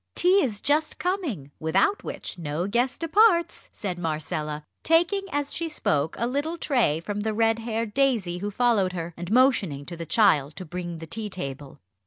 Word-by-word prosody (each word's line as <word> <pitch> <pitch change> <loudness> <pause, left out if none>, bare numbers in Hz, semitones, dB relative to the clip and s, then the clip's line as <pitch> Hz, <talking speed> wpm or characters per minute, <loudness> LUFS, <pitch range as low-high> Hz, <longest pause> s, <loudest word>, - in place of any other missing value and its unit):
Tea 370 +3 +5
is 215 - -2
just 300 +2 +1
coming, 315 - -2
without 190 - +1
which - - -6
no 155 +2 -2
guest 240 +8 0
departs," 340 +1 +3
said 185 -5 -5
Marcella, 155 -2 -3 0.2
taking 340 +5 +3
as 290 0 -1
she 335 0 -2
spoke 155 - 0
a 235 - 0
little 290 +7 -2
tray 245 - +1
from 205 +5 -4
the 215 +1 -1
red 225 0 +2
haired 225 -1 -3
Daisy 230 -11 +1
who 205 +2 -3
followed 205 -4 +2
her, 170 -1 -5
and 175 +2 -6
motioning 215 - +3
to 175 - -7
the 165 -1 -7
child 155 -9 +3
to 185 - -7
bring 175 0 -5
the 165 - -8
tea 210 +6 -4
table. 140 -6 -6
205 Hz, 180 wpm, -26 LUFS, 165-275 Hz, 0.2 s, Tea